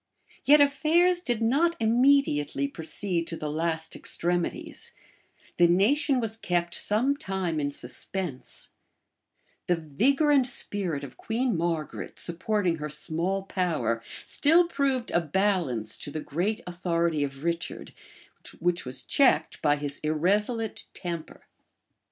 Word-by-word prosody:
Yet 295 +2 +7
affairs 325 +5 +3
did 240 -9 -1
not 310 +9 +2
immediately 225 - +2
proceed 170 +3 -2
to 165 - -3
the 150 -1 -4
last 160 +1 -1
extremities; 175 0 -2 0.6
the 175 - +6
nation 255 - +3
was 225 -2 -1
kept 175 -5 -1
some 245 +7 +2
time 190 - -2
in 145 -1 0
suspense; 145 +3 -3 1.0
the 175 - +3
vigor 245 - +1
and 270 -3 +4
spirit 180 - -1
of 135 -2 -9
Queen 235 0 -1
Margaret, 165 -3 -3
supporting 180 0 0
her 150 0 -5
small 170 +6 -1
power, 155 - -1 0.2
still 330 +4 +4
proved 275 -6 -1
a 170 - +2
balance 160 - 0
to - - -4
the 155 - -4
great 175 +9 -2
authority 170 -3 0
of 140 0 -5
Richard, 170 +1 -3 0.6
which 175 -2 0
was 130 +1 0
checked 275 -2 +2
by 145 -1 +3
his 145 -1 -4
irresolute 205 +9 0
temper. 170 -3 -6
175 Hz, 125 wpm, -27 LUFS, 155-230 Hz, 1.0 s, Yet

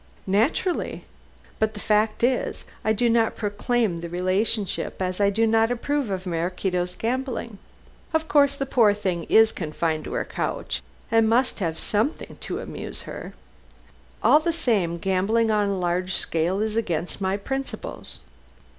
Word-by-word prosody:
"Naturally. 230 - 0 0.5
But 220 0 +1
the - - -6
fact 215 +1 +1
is, 250 +1 +1 0.2
I 220 - +2
do 230 +3 +2
not 230 -1 +3
proclaim 205 -3 0
the 170 - -5
relationship, 190 +4 -1
as 185 0 -2
I 200 - +5
do 225 +3 +2
not 225 0 +3
approve 265 +1 -1
of 190 -1 -3
Maraquito's 180 +1 -1
gambling. 235 -2 -3 0.5
Of 320 -1 0
course 280 -2 +4
the 275 - -2
poor 225 -6 +4
thing 185 -5 -2
is 220 0 +6
confined 160 -1 -2
to - - -5
her - - -1
couch - - -3 0.3
and 225 -1 +4
must 240 +2 +2
have 165 -4 -1
something 220 +9 -1
to - - -4
amuse - - -6
her. - - -8 0.9
All 300 - +7
the 335 +2 0
same, 215 - +1
gambling 195 +5 +1
on 210 -1 +2
a 200 - -1
large 180 +1 0
scale 170 +5 0
is 215 0 -1
against 180 -4 -2
my 190 +1 +1
principles. 270 - -5
210 Hz, 155 wpm, -25 LUFS, 185-235 Hz, 0.9 s, All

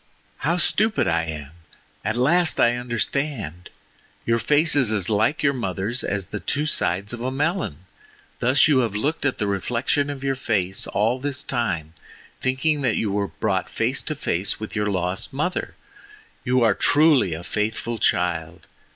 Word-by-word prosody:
"How 170 +4 0
stupid 215 - +2
I 85 -1 +1
am! 75 -3 -6 0.5
At 110 +3 -1
last 170 +7 +3
I 120 0 +4
understand. 120 - -3 0.6
Your 115 0 +2
face 150 +5 +3
is 130 -6 +3
as 105 -5 +1
like 110 +7 +1
your 140 -1 +3
mother's 110 0 0
as 100 -2 -2
the 105 - -2
two 145 +7 -1
sides 100 - 0
of 120 - -6
a 125 - -1
melon—thus 130 - -1
you 145 -4 +4
have 115 -5 0
looked 145 +9 -1
at 130 - -2
the - - -1
reflection 120 +8 0
of 140 -2 -6
your 135 0 +1
face 100 -8 -1
all 115 +5 0
this 140 0 -3
time, 85 - -2 0.5
thinking 130 +4 0
that 125 -5 +1
you 105 - -1
were 100 0 0
brought 95 -4 -2
face 120 +4 -1
to 155 - -2
face 100 - -1
with 110 - -6
your 105 0 0
lost 95 +1 -1
mother! 150 +7 -2 0.7
You 125 -1 +2
are 115 - +4
truly 145 - +3
a 85 - -8
faithful 110 +3 -2
child. 85 -2 0
115 Hz, 165 wpm, -23 LUFS, 100-140 Hz, 0.7 s, I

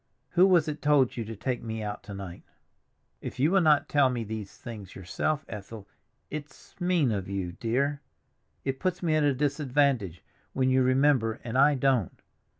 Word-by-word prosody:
Who 185 +2 +5
was 175 -5 +4
it 150 0 -4
told 145 -4 +3
you 115 - -3
to 115 +1 -7
take 125 +4 -3
me 110 -1 -5
out 105 0 -5
to - - -5
night?" 95 -3 -8 0.8
"If - - -7
you 150 +6 +3
will 195 0 +4
not 155 -3 +4
tell 140 -3 +3
me 120 -2 -2
these 110 -2 -7
things 105 -5 -9
yourself, 115 - -2
Ethel—it's 110 +8 -10
mean 175 -8 +2
of 100 -3 -3
you, 95 -3 -3
dear; 135 - -1 0.6
it 135 -1 -2
puts 180 -1 -2
me 165 -2 +1
at 155 - +3
a 145 - +4
disadvantage 140 - 0 0.3
when 130 -1 +1
you 130 0 +4
remember 130 -3 +2
and 115 0 -5
I 140 +2 +5
don't. 130 - +1
130 Hz, 175 wpm, -28 LUFS, 110-145 Hz, 0.8 s, Who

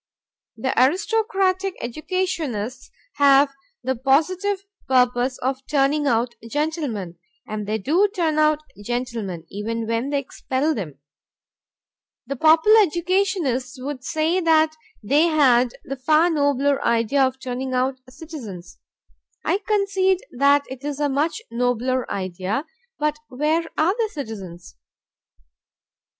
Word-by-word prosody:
The 260 +4 -1
aristocratic 385 - +1
educationists 265 - -3 0.3
have 280 -1 +5 0.3
the 260 0 0
positive 365 - +1 0.2
purpose 250 0 +2
of 265 +1 -2
turning 290 +1 +2
out 235 -1 +1 0.2
gentlemen, 275 - -3 0.3
and 210 -1 -4
they 215 +1 0
do 325 - +2
turn 325 -6 0
out 305 0 +3 0.2
gentlemen, 230 -8 -4
even 225 +3 -3
when 230 +4 -1
they 285 - 0
expel 275 +2 -1
them. 165 - -6 1.3
The 275 +3 -4
popular 320 - +6
educationists 345 - 0
would 265 0 -5
say 315 +5 0
that 315 -2 +3 0.3
they 285 +10 +3
had 255 -6 +3
the 275 - -5
far 310 +6 +3
nobler 285 -2 +1
idea 235 +4 +2
of 260 0 +1
turning 260 0 -4
out 260 +1 0
citizens. 250 - -9 0.7
I 385 - +1
concede 395 -2 +1
that 280 +2 +4
it 260 +1 -9
is 290 -1 -4
a 295 -1 +1
much 310 +10 -1
nobler 245 +1 0
idea, 190 - -3 0.3
but 300 0 -1
where 305 +5 0
are 330 +5 +3
the 445 0 -1
citizens? 195 - -8
275 Hz, 120 wpm, -22 LUFS, 245-320 Hz, 1.3 s, popular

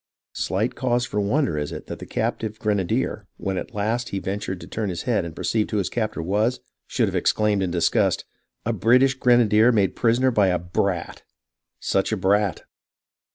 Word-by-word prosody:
Slight 110 +7 -1
cause 120 -1 0
for 105 - -3
wonder 105 - +1
is 75 - -3
it - - -7
that - - -7
the - - -9
captive 110 -1 -2
grenadier, 100 -5 -1
when 95 -1 -2
at - - -8
last 110 +4 -1
he 100 - -3
ventured 95 -1 -3
to - - -9
turn 110 -2 -3
his 85 -2 -4
head 120 -7 +1
and 80 -2 -7
perceived 110 -2 0
who 105 - -1
his 100 - 0
captor 110 -7 -2
was, 105 +8 +1 0.3
should - - +1
have - - -3
ex - - +3
claimed 105 -2 +1
in 95 - 0
disgust: 85 -1 +1 0.2
" - - -51
A - - 0
British 130 +4 +4
grenadier 120 -3 +4
made 100 -5 +2
a - - -27
prisoner 125 +2 +2
by 105 -4 +3
a 90 -1 +2
brat! 90 0 -2 0.6
Such 95 +2 0
a 110 - 0
brat 100 +1 +1
105 Hz, 200 wpm, -23 LUFS, 95-120 Hz, 0.6 s, British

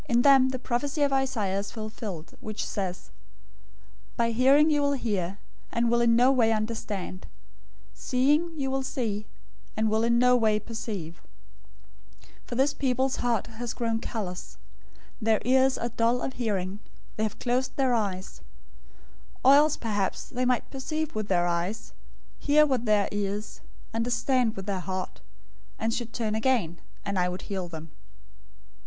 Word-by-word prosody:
013:014 235 - +2
In 240 - +5
them 270 -2 +6
the 260 - -2
prophecy 275 +4 -1
of 280 -1 +2
Isaiah 230 -8 0
is 200 - -5
fulfilled, 215 -6 -6
which 215 -1 -4
says, 185 -3 -4 1.1
'By 230 -1 +2
hearing 275 +6 +5
you 295 -1 +3
will 285 0 +2
hear, 200 -8 -2 0.3
and 235 0 +1
will 235 0 +3
in 235 -1 +4
no 250 +3 +5
way 235 -4 +3
understand; 215 -4 -3 0.7
Seeing 295 +6 +1
you 270 -1 -1
will 270 0 0
see, 220 -6 -3 0.5
and 220 0 +1
will 220 +1 +2
in 235 0 +3
no 250 +1 +5
way 220 -3 +3
perceive: 205 -7 -6 1.0
013:015 - - -22 0.2
for 240 - -5
this 270 +3 +2
people's 260 -1 0
heart 235 -4 0
has 235 0 -6
grown 230 -2 -1
callous, 195 -6 -5 0.6
their 220 -1 +3
ears 260 +1 +4
are 235 - -2
dull 235 +1 +1
of 265 - -3
hearing, 200 -5 -2 0.4
they - - -2
have 220 -1 -1
closed 255 +1 -1
their 265 -3 +2
eyes; 195 -5 -2 1.0
or 270 - +9
else 295 +1 +5
perhaps 205 -4 -2
they 250 0 -1
might 250 -1 0
perceive 310 +3 -3
with 215 -1 -3
their 175 -3 +2
eyes, 175 +5 -2 0.5
hear 300 +1 +5
with 260 -5 0
their 210 -2 +3
ears, 205 +1 -3 0.3
understand 235 +1 +1
with 195 - -6
their 195 -2 -2
heart, 185 0 -5 0.6
and 225 +1 -1
should 235 -1 -3
turn 225 -2 -2
again; 220 -7 +1 0.3
and 200 -2 -1
I 180 0 +2
would 180 +1 -6
heal 190 -3 -4
them.' 160 -2 -9
230 Hz, 160 wpm, -27 LUFS, 205-260 Hz, 1.1 s, or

